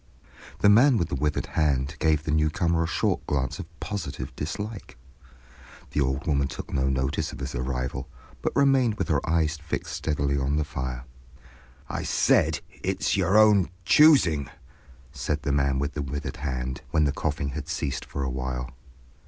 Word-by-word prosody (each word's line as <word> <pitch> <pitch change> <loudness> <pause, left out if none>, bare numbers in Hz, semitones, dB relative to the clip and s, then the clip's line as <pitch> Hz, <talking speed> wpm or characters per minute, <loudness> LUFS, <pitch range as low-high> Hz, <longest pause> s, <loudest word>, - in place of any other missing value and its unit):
The - - +5
man 120 +5 +6
with 85 - 0
the - - -2
withered 75 +2 -1
hand 70 -2 0
gave 75 -2 +2
the 80 - -2
newcomer 80 +2 +1
a - - -1
short - - 0
glance 65 -3 -1
of - - -6
positive 75 -10 -5
dislike; 100 - -5 0.9
the 75 - 0
old 65 +3 -1
woman 70 -4 +1
took - - -8
no 65 0 +1
notice 65 +4 -1
of - - -9
his - - -5
arrival, 65 +1 -3 0.3
but - - -2
remained 135 -5 +4
with - - -3
her 75 -4 +2
eyes 80 -1 +1
fixed 75 0 -5
steadily 70 -2 0
on 70 +2 0
the 75 - +1
fire. 65 -3 -5 0.8
"I - - -3
said—it's - - +1
your 95 +1 +3
own 105 -3 +5 0.2
choosing," 110 - +5 0.6
said 70 +1 -3
the 70 - 0
man 70 -1 +2
with 70 +2 -2
the 75 - -3
withered 70 +2 -4
hand, 65 -1 -3
when 80 - +2
the 70 - +2
coughing 75 0 -2
had 70 +1 -6
ceased - - -2
for 70 - -5
a 65 - -1
while. 65 +1 -4
75 Hz, 170 wpm, -26 LUFS, 65-85 Hz, 0.9 s, man